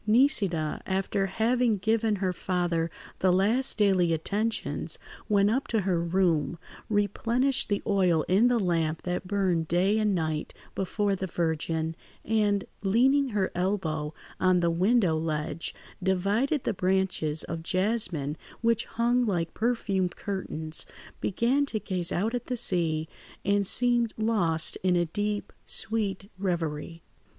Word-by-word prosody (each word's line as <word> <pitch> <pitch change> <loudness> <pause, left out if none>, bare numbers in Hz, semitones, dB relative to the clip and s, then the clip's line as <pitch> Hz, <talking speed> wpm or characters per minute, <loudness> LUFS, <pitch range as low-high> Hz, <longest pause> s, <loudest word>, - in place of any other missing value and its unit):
Nisida, 205 - +3
after 195 +1 0
having 230 +3 +1
given 220 +2 +1
her 185 -2 -1
father 175 -2 -1 0.3
the 185 - +3
last 215 +9 +2
daily 190 -5 +3
attentions, 210 +8 -1 0.3
went 205 0 +4
up 265 +4 0
to 225 -2 +1
her 180 -3 0
room, 170 -2 +1 0.3
replenished 230 +6 +1
the 205 -1 0
oil 180 -6 +2
in 200 +6 +3
the 245 -1 +2
lamp 165 -4 0
that 180 +1 -3
burned 185 -5 0
day 190 +6 +2
and 210 -2 +2
night 155 -3 -2 0.2
before 200 +1 0
the 190 0 -4
Virgin, 160 -1 -1 0.3
and, 210 -3 +1 0.2
leaning 260 +8 +3
her 205 -4 0
elbow 175 -5 -1 0.3
on 185 -1 +3
the 170 -1 +2
window 185 0 +3
ledge, 155 0 -3 0.3
divided 200 - +1
the 230 - 0
branches 185 -5 0
of 165 -1 -5
jasmine 180 -5 0 0.2
which 230 -1 +2
hung 240 +2 +1
like 175 -7 -1
perfumed 200 -6 0
curtains, 160 -5 -3 0.4
began 245 +8 +1
to 220 - -2
gaze 185 -5 -1
out 215 +6 0
at 245 - -3
the 250 - -2
sea, 165 -6 +1 0.4
and 200 0 +2
seemed 240 0 +3
lost 185 -8 +1
in 180 -1 +2
a 175 0 +2
deep, 205 +5 -3
sweet 205 -3 -1
reverie. 165 -3 -3
190 Hz, 135 wpm, -27 LUFS, 170-220 Hz, 0.4 s, went